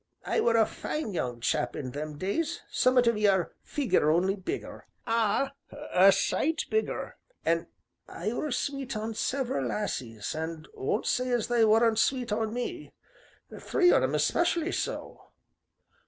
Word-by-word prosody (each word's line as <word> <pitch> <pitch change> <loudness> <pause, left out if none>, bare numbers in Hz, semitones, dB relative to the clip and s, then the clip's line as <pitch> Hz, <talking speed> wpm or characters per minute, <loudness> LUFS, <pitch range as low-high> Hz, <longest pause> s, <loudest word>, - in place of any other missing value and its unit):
I - - +1
were 230 -1 +3
a 220 - +5
fine 300 -4 -4
young 120 -8 -3
chap 120 +1 0
in 130 -3 -5
them 150 +2 -5
days, 300 - -2
summat 255 -1 +3
o' - - +6
your 200 -5 +2
figure 190 - +1
only 180 +5 +2
bigger 190 -2 -6 0.2
ah! 230 +4 +1 0.4
a 190 +2 +7
sight 300 +11 +1
bigger 440 0 -1 0.3
an' 165 +1 +1 0.4
I 210 +7 -4
were 295 +4 -2
sweet 270 -3 -2
on 220 +1 -3
several 245 - -1
lassies, 120 - -3
an' 160 0 -5
won't 205 - -1
say 255 0 0
as 240 -3 0
they 240 -1 +3
wer'n't 225 +1 +4
sweet 250 -2 +1
on 220 +1 0
me 275 +8 -5 0.7
three 360 -4 +3
on - - +5
'em 130 +2 0
most 150 -1 +2
especially 345 0 +1
so. - - -4
220 Hz, 155 wpm, -28 LUFS, 165-255 Hz, 0.7 s, a